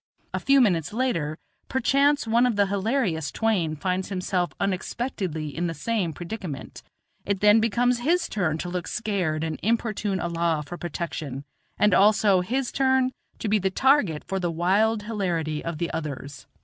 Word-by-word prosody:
A - - -1
few 275 0 +4
minutes 175 - +1
later, 170 -12 -1 0.3
perchance 280 +2 +2
one 235 +2 +3
of 240 - 0
the 200 0 +4
hilarious 195 - -1
twain 185 -9 0
finds 185 +3 -2
himself 180 -2 -1
unexpectedly 185 - -3
in 175 +1 -1
the 165 - -4
same 195 +1 -1
predicament; 170 -4 -7 0.4
it 200 -1 -1
then 210 +2 +6
becomes 240 +2 +2
his 330 +8 +1
turn 175 -7 -1
to 175 - -4
look 180 -1 -3
scared 185 -9 -1
and 160 -1 -3
importune 215 -3 0
Allah 170 -2 0
for 175 - -7
protection, 155 -5 -5 0.3
and 210 -2 +4
also 205 -2 +5
his 250 +7 -1
turn 260 -1 +2 0.3
to - - -4
be 210 +1 +3
the 190 0 +1
target 210 - +2
for 195 - -3
the 175 -2 -1
wild 200 +6 +2
hilarity 175 -8 -2
of 165 -2 -4
the 170 +2 -2
others. 140 -3 -6
190 Hz, 160 wpm, -25 LUFS, 165-225 Hz, 0.4 s, then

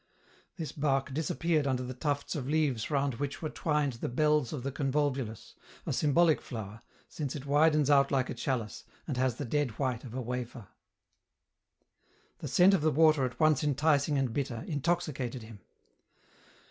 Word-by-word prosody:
This 160 -4 -4
bark 140 -2 0
disap 150 -2 -2
peared 155 -2 +1
under 130 -1 0
the 130 +1 -5
tufts 145 +2 -2
of 135 -3 -4
leaves 145 -8 0
round 140 -4 0
which 140 -1 -3
were 155 - -2
twined 150 -4 0
the - - -2
bells 150 0 +2
of 140 -5 -5
the 140 - -2
convolvulus, 135 -4 -2 0.3
a - - -2
symbolic 160 +2 +3
flower, 110 -2 -7 0.3
since 145 -3 -5
it 140 -2 -6
widens 150 0 +3
out 140 -1 +5
like 130 -2 +1
a - - -4
chalice, 120 -2 -3 0.2
and 145 - -2
has 130 -2 +1
the - - -5
dead 130 -2 -1
white 130 -4 -1
of 125 -2 -9
a 130 - -2
wafer. 120 -2 -5 1.7
The - - -5
scent 185 +2 +5
of 190 - +3
the 155 - +3
water, 155 -2 +4
at 125 0 -6
once 155 -3 +3
enticing 145 0 +2
and 130 -4 0
bitter, 125 -4 -3
intoxicated 145 -6 -2
him. 110 -2 -12
140 Hz, 170 wpm, -30 LUFS, 125-150 Hz, 1.7 s, out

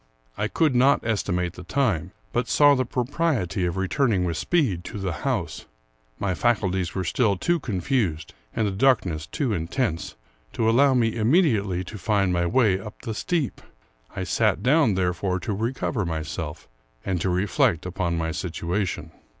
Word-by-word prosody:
I 105 - -1
could 155 +4 +1
not 130 +2 +4
estimate 90 -6 -1
the - - -10
time, 95 - 0 0.2
but 120 - 0
saw 145 -1 +6
the 130 -2 +1
propriety 125 - -1
of 85 - -3
returning 95 +1 +1
with 85 -2 -1
speed 105 - 0
to - - -6
the 95 -2 -2
house. - - -2 0.5
My 100 -2 -1
faculties 95 -5 0
were 95 - -1
still 100 +2 +1
too 175 - +1
con 105 -10 -3
fused, 85 - -1 0.2
and 110 - +1
the 100 - 0
darkness 95 - +1
too 130 - -1
intense, 85 - -2 0.4
to 110 - 0
allow 130 +4 +4
me 115 -2 +3
immedi 130 - +3
ately 95 -3 -2
to 105 +3 -8
find 100 -2 +1
my 85 0 +1
way 105 -3 +3
up 105 +2 -10
the 110 - -3
steep. 155 +4 -2 0.5
I - - -2
sat 95 - +1
down, 130 -5 +4
therefore, 90 0 0
to 105 - -2
recover 115 +1 -2
myself, 80 -1 -5 0.4
and 90 -3 -1
to 95 - 0
reflect 95 - +1
upon 90 -2 -2
my 80 0 -1
situation. 90 +4 -3
100 Hz, 165 wpm, -24 LUFS, 90-125 Hz, 0.5 s, saw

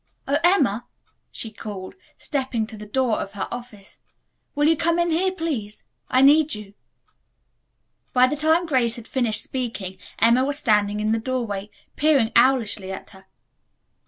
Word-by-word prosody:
"Oh, 280 +1 +2
Emma," 275 - +3 0.4
she 225 - -6
called, 205 -3 -8 0.2
stepping 260 -6 -2
to 220 - -10
the 210 0 -10
door 245 0 0
of 200 - -7
her 200 - -4
office, 235 -5 -9 0.6
"will 295 +1 +3
you 325 - +5
come 335 +2 +1
in 345 0 +1
here, 370 +4 +2
please? 295 - -4 0.3
I 255 +1 +4
need 295 +1 +5
you." 210 -2 -10 1.4
By 250 0 +5
the 255 - -1
time 320 +3 +2
Grace 255 -7 +1
had 235 -2 -10
finished 240 -6 +2
speaking 215 -8 -5 0.2
Emma 235 +3 +4
was 280 +1 -1
standing 210 -4 +2
in 215 +1 0
the 225 - +1
doorway, 220 -5 -3 0.3
peering 275 -7 +3
owlishly 225 -7 +3
at 190 - -8
her. 190 -1 -17
240 Hz, 160 wpm, -23 LUFS, 210-290 Hz, 1.4 s, you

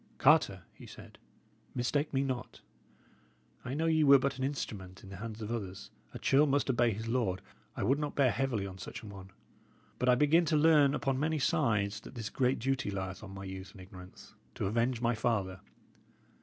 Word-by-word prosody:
"Carter," - - +4
he - - -13
said, - - -13 0.6
"mistake 140 +4 0
me 135 0 +1
not. 130 -3 -4 1.0
I 130 +2 -4
know 160 +2 0
ye 160 -1 +3
were 140 -1 +8
but 135 0 -2
an - - -2
instrument 100 -9 -5
in 95 - -11
the 95 - -8
hands 110 +1 -6
of 105 - -5
others; 100 -4 -5 0.2
a - - -7
churl 145 +3 +3
must 140 -1 +2
obey 120 -1 +3
his 110 +2 -5
lord; 115 -6 -1 0.3
I - - -1
would 135 +4 +2
not 150 -1 -3
bear 135 -4 +4
heavily 125 -7 -1
on 95 -1 -8
such - - -8
an 105 - -9
one. 95 -1 -11 0.7
But 125 - +2
I 125 - +6
begin 150 +6 +4
to 155 -1 +2
learn 150 -2 +5
upon 135 -2 -1
many 155 +2 0
sides 105 -6 +1
that 125 - -13
this 115 -3 -5
great 130 -1 +1
duty 135 -1 -1
lieth 95 -1 -4
on 105 - -8
my 95 - -7
youth 95 +1 -8
and 95 - -12
ignorance, 90 -1 -13 0.2
to - - -2
avenge 115 +4 0
my 120 0 +2
father. 100 -5 -1
120 Hz, 200 wpm, -32 LUFS, 100-135 Hz, 1.0 s, were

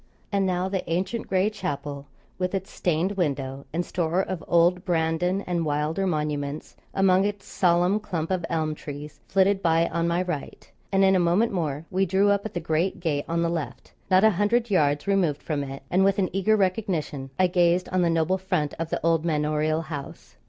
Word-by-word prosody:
And 200 -2 +1
now 180 0 0
the 190 -1 -2
ancient 190 +7 -2
gray 190 +3 +2
chapel, 145 -7 -5 0.3
with 185 +1 -1
its 190 0 -4
stained 175 +2 0
window, 140 -8 -2
and 175 +2 -1
store 175 0 -1
of 185 -3 -5
old 175 +1 +3
Brandon 175 +2 0
and 175 -3 -2
Wylder 155 +5 -1
monuments 150 -3 -3 0.2
among 190 -1 +3
its 205 0 -3
solemn 180 +3 +2
clump 175 -5 -4
of 185 -2 0
elm 160 -2 0
trees, 150 0 -8
flitted 195 0 +3
by 165 -1 +3
on 170 0 -1
my 170 +2 +1
right; 175 -6 -6 0.2
and 195 0 +3
in 190 0 +5
a - - +4
moment 180 +7 +2
more 155 -5 -2
we 190 +1 +1
drew 195 +3 +3
up 200 +1 0
at - - -16
the - - 0
great 165 +3 -1
gate 150 -5 -1
on 170 0 +1
the - - +1
left; 165 -3 -5 0.2
not 185 +1 +5
a 220 - +6
hundred 210 +4 +1
yards 145 -5 +2
removed 185 -7 +1
from 150 -3 -2
it, 135 0 -7
and 185 +2 +4
with 195 +1 +3
an 190 -2 0
eager 215 +3 +3
recognition, 180 -8 -1
I 185 - +4
gazed 175 0 +2
on 185 0 +1
the 170 - +3
noble 165 +3 +1
front 180 -6 -1
of 165 -1 -3
the - - -2
old 165 -1 +3
manorial 155 0 0
house. 145 -4 -8
175 Hz, 200 wpm, -25 LUFS, 155-190 Hz, 0.3 s, a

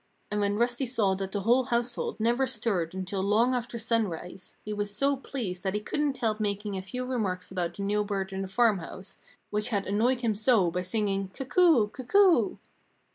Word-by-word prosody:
And 210 - 0
when 205 0 +1
Rusty 245 +3 +1
saw 215 -6 +2
that 195 0 -4
the 205 - -2
whole 245 +5 +3
household 240 0 -1
never 240 +4 +2
stirred 205 -9 -1
until 190 +1 -3
long 220 +6 +3
after 245 -1 -3
sunrise, 205 -6 -2
he 210 - -3
was 205 0 -2
so 275 +7 +1
pleased 230 -9 -5
that 190 +1 -2
he - - +1
couldn't 285 +5 -1
help 225 -3 0
making 205 -1 -2
a 190 - -3
few 250 +7 -5
remarks 200 -9 -2
about 175 -2 -2
the 200 - -5
new 210 +1 +1
bird 195 -2 -3
in 190 - -3
the 195 - -3
farmhouse, 190 -4 -1 0.3
which 210 0 -1
had 200 -4 -1
annoyed 235 +6 +1
him 230 -3 +1
so 210 -4 +3
by 180 +1 -1
singing 195 0 -1
"Cuckoo! 275 - +3
cuckoo!" 345 - +3
210 Hz, 190 wpm, -28 LUFS, 195-245 Hz, 0.3 s, whole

